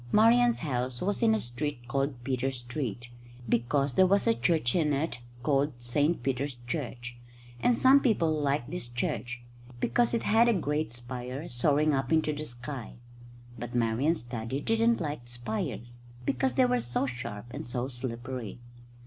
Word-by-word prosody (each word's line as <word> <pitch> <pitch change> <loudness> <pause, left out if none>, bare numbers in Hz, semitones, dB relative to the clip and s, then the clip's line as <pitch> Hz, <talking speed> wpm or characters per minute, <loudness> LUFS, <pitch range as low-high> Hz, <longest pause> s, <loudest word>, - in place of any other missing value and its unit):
Marian's 235 +2 +5
house 125 -4 -2
was 200 +2 -1
in 225 -1 +5
a - - 0
street 120 -1 -4
called 135 0 -1
Peter 130 0 0
Street, 120 -2 -4 0.4
because 130 +5 +1
there 185 +8 +5
was 200 +2 +3
a 230 - +5
church 160 - +1
in 155 -4 +2
it 140 -3 -1 0.2
called 145 0 +2
St 145 +5 0
Peter's 135 +1 -1
Church; 125 -3 -4 0.4
and 240 - +3
some 265 +2 +7
people 215 - +2
liked 145 -4 0
this 175 -8 -4
church, 120 0 -3 0.4
because 240 - +2
it 230 - -1
had 230 +3 +5
a - - +4
great 150 - -1
spire 125 +5 -6
soaring 145 +5 +2
up 135 -2 -1
into 160 -1 +3
the 150 +1 -4
sky. 120 0 -7 0.7
But 120 +1 -6
Marian's 120 +7 +1
daddy 120 +2 -4
didn't 225 +6 +2
like 145 -7 -4
spires, 120 0 -4 0.3
because 265 - +1
they 260 - +5
were 250 0 +2
so 120 +3 -1
sharp 120 -5 -5
and - - -5
so 120 +1 -2
slippery. 120 -2 -5
135 Hz, 160 wpm, -29 LUFS, 120-160 Hz, 0.7 s, some